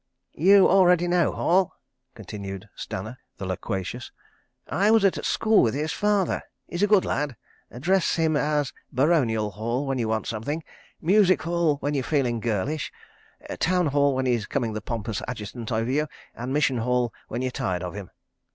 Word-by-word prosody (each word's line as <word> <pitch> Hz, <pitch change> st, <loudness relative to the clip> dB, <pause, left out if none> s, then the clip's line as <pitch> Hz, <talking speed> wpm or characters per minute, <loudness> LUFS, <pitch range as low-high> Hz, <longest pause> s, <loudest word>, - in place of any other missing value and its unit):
"You 195 Hz, +4 st, +6 dB
already 180 Hz, -2 st, +4 dB
know 175 Hz, -2 st, +2 dB
Hall?" 185 Hz, +2 st, +2 dB, 0.4 s
continued 100 Hz, -1 st, -7 dB
Stanner, 110 Hz, +7 st, -6 dB, 0.2 s
the 95 Hz, -, -5 dB
loquacious. 95 Hz, +5 st, -4 dB, 0.6 s
"I 200 Hz, +5 st, +2 dB
was 220 Hz, -2 st, +5 dB
at 195 Hz, -, +1 dB
school 220 Hz, -1 st, +3 dB
with 115 Hz, +2 st, +1 dB
his 150 Hz, +2 st, -1 dB
father. 205 Hz, -3 st, +1 dB, 0.2 s
He's 175 Hz, -, -5 dB
a 205 Hz, -, +4 dB
good 205 Hz, -2 st, +4 dB
lad. 145 Hz, -3 st, -1 dB, 0.3 s
Address 175 Hz, +8 st, +1 dB
him 160 Hz, -2 st, +1 dB
as 145 Hz, -5 st, 0 dB, 0.2 s
Baronial 125 Hz, -7 st, +2 dB
Hall 115 Hz, +7 st, -2 dB
when 135 Hz, -1 st, -1 dB
you 115 Hz, -, 0 dB
want 110 Hz, 0 st, -1 dB
something, 135 Hz, +9 st, -3 dB, 0.4 s
Music 185 Hz, +2 st, +4 dB
Hall 170 Hz, -3 st, +1 dB
when 145 Hz, +2 st, -1 dB
you're 135 Hz, -2 st, 0 dB
feeling 125 Hz, -5 st, 0 dB
girlish, 120 Hz, +7 st, -2 dB, 0.7 s
Town 180 Hz, 0 st, +2 dB
Hall 140 Hz, -1 st, +2 dB
when 130 Hz, 0 st, 0 dB
he's 120 Hz, -4 st, 0 dB
coming 120 Hz, -5 st, -1 dB
the 110 Hz, -, -4 dB
pompous 115 Hz, -1 st, -4 dB
Adjutant 115 Hz, -1 st, -6 dB
over 115 Hz, +2 st, 0 dB
you, 150 Hz, +3 st, +1 dB, 0.3 s
and 120 Hz, +2 st, -5 dB
Mission 135 Hz, -3 st, +2 dB
Hall 125 Hz, 0 st, 0 dB
when 125 Hz, -, -3 dB
you're 130 Hz, -, -1 dB
tired 90 Hz, -6 st, -2 dB
of 90 Hz, -, -5 dB
him." 100 Hz, -2 st, -7 dB
135 Hz, 170 wpm, -25 LUFS, 115-170 Hz, 0.7 s, You